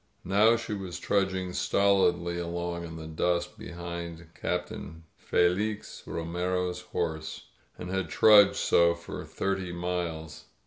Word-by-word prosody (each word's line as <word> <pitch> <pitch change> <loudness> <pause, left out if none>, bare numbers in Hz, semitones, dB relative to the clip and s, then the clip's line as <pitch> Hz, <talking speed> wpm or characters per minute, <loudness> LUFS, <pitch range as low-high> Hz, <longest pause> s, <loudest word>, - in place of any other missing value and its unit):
Now 105 +5 +5
she 115 - -5
was 95 -3 -5
trudging 95 -2 0
stolidly 90 -4 +2
along 85 0 -3
in 80 -1 -8
the 80 -1 -7
dust 85 +2 -1
be - - -8
hind 85 -1 -6
Captain 80 0 -4
Felix 100 +5 0
Romero's 90 +2 -2
horse 80 -2 -4 0.2
— - - -36
and 90 - -6
had 95 -3 -1
trudged 100 +3 +7
so 85 0 +4
for 85 - -7
thirty 95 -2 -2
miles. 85 -3 -4
90 Hz, 130 wpm, -29 LUFS, 85-95 Hz, 0.2 s, trudged